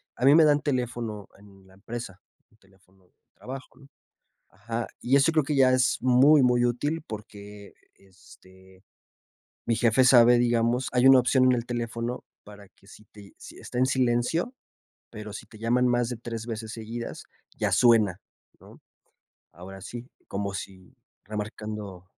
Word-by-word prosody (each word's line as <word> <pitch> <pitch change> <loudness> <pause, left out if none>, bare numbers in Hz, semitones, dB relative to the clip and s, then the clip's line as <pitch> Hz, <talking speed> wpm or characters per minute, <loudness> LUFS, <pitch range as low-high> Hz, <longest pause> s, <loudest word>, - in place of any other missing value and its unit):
A 125 - -2
mí 140 - +7
me 165 - +7
dan 145 -1 +3
teléfono 120 -6 -4
en 100 -1 -19
la 95 - -21
empresa, 110 -1 -8 0.3
un 110 - -28
teléfono 95 -2 -28
de - - -35 0.2
trabajo, 130 +2 -10
¿no? 140 - -17 0.6
Ajá. 115 +4 -5
Y 130 +3 +2
eso 140 +4 +4
creo 155 -2 +2
que 145 +1 -2
ya 130 -1 +4
es 130 -1 +2
muy, 130 +4 +5
muy 120 -1 +3
útil, 145 +7 -2
porque, 105 -1 -11 0.2
este, 95 0 -20 0.8
mi 115 - +1
jefe 120 +2 +3
sabe, 120 -1 +6
digamos, 120 +1 +1
hay 125 +1 +2
una 135 -1 +8
opción 130 +1 +2
en 130 - +5
el 120 -1 -2
teléfono 120 0 -4 0.2
para 100 -1 -14
que 100 - -26
si 105 - -16
te 105 - -16
ll 100 - -16
si - - -13
está 125 - -8
en 130 - +3
silencio, 130 - 0 0.6
pero 105 -2 -9
si - - -9
te 110 - -16
llaman 120 +2 +1
más 120 -1 0
de 120 - -5
3 115 -1 -7
veces 110 -1 -6
seguidas, 115 +1 -7 0.3
ya - - -2
suena, 110 -7 +3 0.4
¿no? - - -17 0.7
Ahora 95 +3 -11
sí, 120 +6 -9 0.2
como 100 0 -4
sí, 95 -2 -9 0.3
remarcando 105 -2 -7
115 Hz, 165 wpm, -26 LUFS, 100-125 Hz, 0.8 s, una